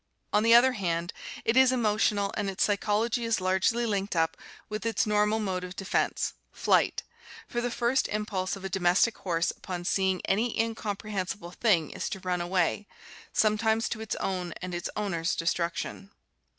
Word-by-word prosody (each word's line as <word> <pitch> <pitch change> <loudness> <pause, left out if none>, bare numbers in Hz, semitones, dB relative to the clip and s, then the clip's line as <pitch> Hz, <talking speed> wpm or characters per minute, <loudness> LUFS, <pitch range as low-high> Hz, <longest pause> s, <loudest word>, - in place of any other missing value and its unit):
On 210 - +4
the 230 +1 +6
other 255 +2 +7
hand, 175 -6 -2 0.3
it 225 - +2
is 260 -1 +6
emotional 210 -4 +1
and 200 - -1
its 190 - 0
psychology 215 +3 +1
is 230 -2 +1
largely 190 +6 +1
linked 200 -3 -1
up 165 -1 +1 0.3
with 215 -1 -5
its 230 -1 +1
normal 210 0 +2
mode 190 -4 -2
of 180 +1 -7
defense 195 0 -1
— - - -45
flight - - +3 0.2
— - - -16
for 240 - -2
the 245 - -1
first 240 +2 +1
impulse 205 -3 -2
of 195 -1 -9
a - - 0
domestic 190 +4 +2
horse 170 -2 0
upon 175 -2 -6
seeing 190 0 +1
any 225 +5 0
incomprehensible 205 -4 -3
thing 180 -7 +2
is - - -4
to 195 - -5
run 180 -1 -1
away, 180 +3 0 0.4
sometimes 220 +1 +2
to 220 - -4
its 220 - -3
own 180 -3 -3
and 185 -1 -5
its 175 0 -3
owner's 175 -5 -1
destruction. 170 +3 -2
200 Hz, 175 wpm, -28 LUFS, 180-220 Hz, 0.4 s, other